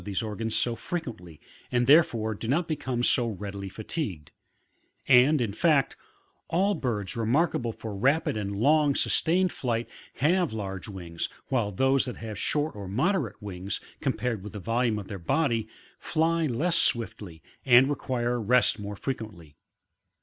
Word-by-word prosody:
these 100 +2 -2
organs 110 +1 -3
so 120 -1 +1
frequently, 115 - -6 0.3
and 120 0 +2
therefore 120 -7 +4
do 110 +2 -6
not 160 +7 +1
become 130 -6 -2
so 125 -1 +3
readily 100 -2 -5
fatigued: 105 - -5 0.8
and, 135 +3 +6
in 115 -5 -1
fact, 150 +3 +2 0.5
all 195 +5 +2
birds 115 - -3
remarkable 120 +1 +1
foir 110 -1 -7
rapid 135 +7 +2
and 100 -2 -3
long 145 +5 +3
sustained 180 +2 +2
flight 120 -2 -2 0.3
have 175 +4 +2
large 95 -3 -5
wings, 85 -5 -5 0.2
while 120 -6 +1
those 135 +7 +2
that 125 - -5
have 110 -2 -6
short 150 -2 0
or 100 -2 -7
moderate 130 - 0
wiiigs, 95 -2 -5 0.2
compared 115 -2 -1
with 105 - -8
the 105 - -5
volume 115 +2 0
of 100 -2 -6
their 100 -3 -6
body, 115 - 0 0.3
fly 165 0 +1
less 165 +7 +1
swiftly 105 - -1 0.2
and 125 +1 +6
require 125 -4 -1
rest 120 +1 +3
more 105 0 -5
frequently. 100 - -6
115 Hz, 150 wpm, -27 LUFS, 105-140 Hz, 0.8 s, and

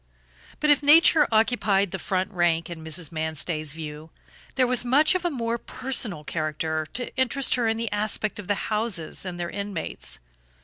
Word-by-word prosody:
But 300 0 +3
if 290 - +4
nature 305 +1 +6
occupied 215 -4 +2
the 190 - -4
front 185 +1 -1
rank 175 -2 +1
in 160 -2 -8
Mrs. 160 0 -4
Manstey's 155 -1 -3
view, 155 0 -8 0.5
there 260 - +3
was 250 -1 +3
much 275 +5 +4
of 370 -1 -1
a - - +3
more 235 -5 -2
personal 225 - -2
character 155 0 -2
to 245 - -3
interest 260 +1 +1
her 245 -2 +1
in 225 0 0
the 230 -2 -3
aspect 210 0 -1
of 200 - -8
the 205 - +1 0.2
houses 210 -5 -1
and 175 -1 -6
their 175 0 -3
inmates. 200 -4 -6
200 Hz, 175 wpm, -25 LUFS, 165-245 Hz, 0.5 s, nature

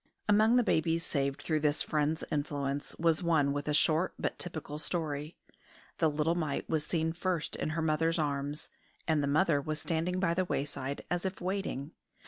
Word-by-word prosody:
Among 215 +3 +5
the 250 - +5
babies 165 -4 +1
saved 140 -2 -1
through 155 -2 +1
this 150 0 +2
friend's 155 +1 0
influence 145 -1 -2
was 165 -1 +2
one 155 -5 +3
with 145 +1 -3
a 150 - +1
short 160 +3 +3
but - - -2
typical 155 -3 -4
story. 155 -1 -2 0.6
The 160 - +4
little 150 +2 +1
mite 155 -5 -2
was 155 -2 0
seen 160 0 0
first 175 -2 -1
in - - -2
her 165 - +1
mother's 160 +2 +2
arms, 145 -1 -2 0.4
and 155 -2 +3
the 140 - 0
mother 150 0 +3
was 155 +1 -3
standing 170 +3 -1
by 185 -3 +2
the 185 +2 +1
wayside, 140 -2 -3
as 175 0 0
if 190 0 -3
waiting. 180 -6 -3
155 Hz, 180 wpm, -31 LUFS, 145-170 Hz, 0.6 s, Among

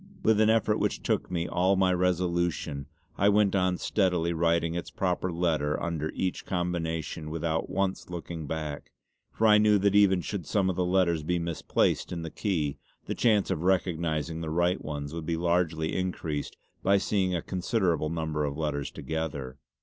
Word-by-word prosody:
With 110 -1 +4
an 110 - +5
effort 110 -1 +2
which - - -1
took - - 0
me 85 -1 -1
all 95 +2 +2
my 95 -1 +3
resolution 85 -5 0 0.3
I 100 - +5
went 105 -1 +3
on 90 -1 +2
steadily 90 -5 +1
writing 85 0 +1
its 85 0 -4
proper 90 -1 -1
letter 80 -4 0
under 80 -2 -2
each 95 -1 -2
combination 80 -3 -3
without 80 0 -2
once 95 -1 -1
looking 85 -3 -6
back; 75 -1 -4 0.4
for 110 - 0
I 105 -1 +7
knew 105 -1 +5
that 100 0 +2
even 100 -3 +5
should 90 -2 -5
some 95 0 +2
of - - -5
the 90 - +1
letters 90 -3 +2
be 90 +4 0
misplaced 85 -2 0
in 85 -2 -4
the 80 - -6
key 80 -9 -1 0.3
the - - -2
chance 105 -4 +2
of 75 - -1
recognising 85 -3 0
the 80 - -3
right 85 +3 +1
ones 75 -1 -5
would 80 -2 -5
be 85 -1 0
largely 85 -2 0
increased 85 -5 -3 0.2
by 100 +1 +4
seeing 95 -2 0
a 85 - -1
considerable 90 -5 0
number 80 -2 -2
of 70 -1 -2
letters 75 -3 -2
together. 70 -5 -4
85 Hz, 175 wpm, -28 LUFS, 80-95 Hz, 0.4 s, I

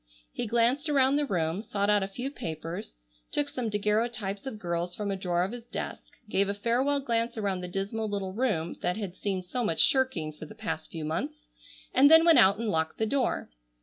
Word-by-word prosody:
He - - -3
glanced 240 +7 +2
around 275 -1 +4
the 295 -1 0
room, 170 -2 0
sought 200 -2 -1
out 205 -1 +4
a 195 - -1
few 245 +7 -5
papers, 165 - -6 0.4
took 290 -1 0
some 245 -5 -3
daguerreotypes 210 0 -1
of 230 - -5
girls 175 -2 -3
from 205 -1 -2
a - - -1
drawer 180 -2 0
of 190 - -2
his 240 -1 -8
desk, - - -5 0.3
gave 200 -1 +1
a 200 - -1
farewell 245 +7 +1
glance 235 -2 -1
around 195 -4 -1
the 180 - -4
dismal 200 +4 -3
little 195 -2 -3
room 200 -8 -1
that 180 - 0
had 195 -5 -5
seen 190 -2 -2
so 240 +7 -2
much 165 -7 0
shirking 260 - +2
for 155 +1 -10
the - - -12
past 155 - -4
few 160 -2 -5
months, 285 - -4 0.4
and 280 +2 +7
then 320 +1 +8
went 330 -6 +7
out 200 -2 +6
and 230 0 -2
locked 160 -4 0
the 220 - +1
door. 255 +3 0
210 Hz, 215 wpm, -28 LUFS, 180-245 Hz, 0.4 s, then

